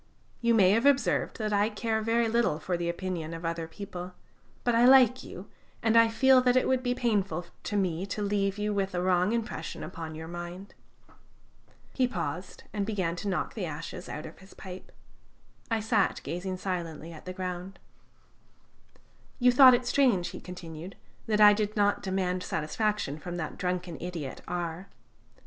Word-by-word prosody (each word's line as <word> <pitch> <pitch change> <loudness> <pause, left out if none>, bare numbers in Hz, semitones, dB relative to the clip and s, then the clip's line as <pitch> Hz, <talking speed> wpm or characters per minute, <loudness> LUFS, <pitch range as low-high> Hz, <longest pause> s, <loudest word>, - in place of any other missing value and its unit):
You 235 -1 +3
may 190 -4 +6
have 230 +6 +3
observed 280 -1 +2
that 215 -3 -2
I 205 +1 +3
care 220 0 -1
very 230 +1 +2
little 225 -8 +1
for 175 +3 -2
the 170 0 -2
opinion 170 -2 -4
of 165 +1 -7
other 165 0 -2
people, 180 0 -8 0.5
but 240 - +2
I 230 +1 +4
like 255 -1 +6
you, 185 +3 -9 0.4
and 225 0 +3
I 230 0 +7
feel 260 +3 +5
that 250 0 +3
it 255 - +2
would 260 -1 +2
be 245 -1 0
painful 200 -8 0 0.2
to 205 - -3
me 185 -1 -1
to 205 +2 -3
leave 200 -1 0
you 210 0 -1
with 195 -2 -1
a 175 - 0
wrong 180 +1 +2
impression 235 0 -3
upon 160 -3 -7
your 160 +1 -7
mind." 175 +3 -7 1.2
He 255 -2 +2
paused, 175 -4 -5
and 205 -2 -1
began 190 -5 -1
to 205 - -5
knock 190 - -1
the 195 -6 -3
ashes 165 +4 -7
out 150 - -6
of 160 - -11
his 190 +1 -16
pipe. 185 0 -10 0.8
I 225 -1 +1
sat 220 +1 +1
gazing 185 +2 -4
silently 170 -3 -4
at 160 - -12
the 185 - -5
ground. 185 +1 -5 1.6
"You 250 -1 +5
thought 255 0 +9
it 245 0 -2
strange," 240 -10 +2
he - - -9
continued, 175 0 -9 0.3
"that 215 -1 +1
I 210 0 +9
did 210 0 -1
not 205 -1 +2
demand 185 -1 -1
satisfaction 160 -1 -2
from 175 +2 -6
that 160 -3 -4
drunken 180 -2 -2
idiot 170 -6 -5
R 175 +1 -4
190 Hz, 175 wpm, -29 LUFS, 175-220 Hz, 1.6 s, thought